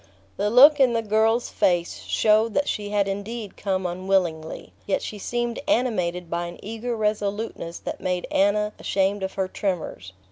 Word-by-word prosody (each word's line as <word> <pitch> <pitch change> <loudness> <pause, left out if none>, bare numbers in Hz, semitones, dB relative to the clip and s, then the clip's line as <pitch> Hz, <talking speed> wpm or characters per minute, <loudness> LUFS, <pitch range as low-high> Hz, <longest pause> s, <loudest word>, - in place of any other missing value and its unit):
The 205 +1 0
look 285 +6 +8
in 255 -3 +5
the 230 -1 0
girl's 220 +2 +2
face 175 -1 0
showed 215 +1 +2
that 285 - +1
she 205 -1 -2
had 205 -1 +1
indeed 205 +2 -5
come 190 -2 -2
unwillingly; 175 -3 -1
yet 195 - 0
she 210 - -6
seemed 240 +2 -2
animated 180 - 0
by 170 +1 -2
an 175 - -9
eager 225 +3 -4
resoluteness 210 -4 -2
that - - -6
made 180 -1 -1
Anna 210 +2 +2
ashamed 195 +1 0
of 190 0 -3
her 190 -1 0
tremors. 180 - -4
205 Hz, 165 wpm, -24 LUFS, 185-225 Hz, -, look